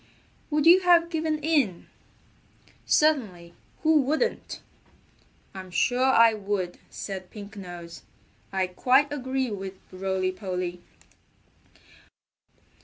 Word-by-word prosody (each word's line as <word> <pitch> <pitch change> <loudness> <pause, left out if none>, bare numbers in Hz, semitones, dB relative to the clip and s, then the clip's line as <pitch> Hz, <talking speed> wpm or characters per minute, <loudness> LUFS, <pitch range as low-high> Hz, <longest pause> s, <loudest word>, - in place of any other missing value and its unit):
"Would 300 -1 0
you 350 +3 +8
have 345 -2 +4
given 315 -1 -1
in?" 285 - +1 1.0
"Certainly! 210 - +1 0.3
Who 315 -1 +5
wouldn't?" 310 - -2 0.9
"I'm 190 -1 -9
sure 245 +8 +1
I 230 -3 +6
would," 195 -4 -3
said 190 -2 -7
Pink 210 0 -10
Nose. 175 -3 -9 0.5
"I 190 -1 0
quite 260 +10 +2
agree 260 -2 -2
with 195 -2 -5 0.2
Rolly 185 0 -1
Polly." 180 -2 -5
210 Hz, 100 wpm, -26 LUFS, 185-295 Hz, 1.0 s, you